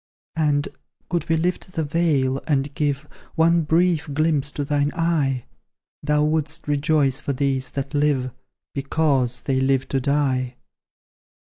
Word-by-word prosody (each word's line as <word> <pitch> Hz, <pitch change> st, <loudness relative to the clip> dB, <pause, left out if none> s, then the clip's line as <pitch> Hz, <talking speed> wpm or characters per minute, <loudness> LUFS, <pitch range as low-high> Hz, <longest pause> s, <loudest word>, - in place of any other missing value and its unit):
"And, 150 Hz, -2 st, +1 dB, 0.4 s
could 175 Hz, -2 st, -1 dB
we 165 Hz, -, +3 dB
lift 180 Hz, +2 st, -2 dB
the 160 Hz, -, -1 dB
veil, 145 Hz, -4 st, +1 dB
and 140 Hz, -2 st, 0 dB
give 145 Hz, 0 st, -1 dB, 0.3 s
One 165 Hz, +1 st, +4 dB
brief 160 Hz, 0 st, +1 dB
glimpse 150 Hz, -2 st, +1 dB
to 145 Hz, -, -2 dB
thine 145 Hz, 0 st, +1 dB
eye, 150 Hz, -7 st, 0 dB, 0.6 s
Thou 150 Hz, 0 st, +2 dB
wouldst 155 Hz, +1 st, -1 dB
rejoice 145 Hz, -2 st, +2 dB
for 140 Hz, -, -2 dB
those 135 Hz, -1 st, 0 dB
that 135 Hz, -1 st, -4 dB
live, 145 Hz, -3 st, +1 dB, 0.4 s
BECAUSE 140 Hz, -3 st, 0 dB
they 135 Hz, -1 st, 0 dB
live 135 Hz, 0 st, +1 dB
to 135 Hz, -, 0 dB
die." 130 Hz, -2 st, 0 dB
145 Hz, 135 wpm, -23 LUFS, 135-160 Hz, 0.6 s, One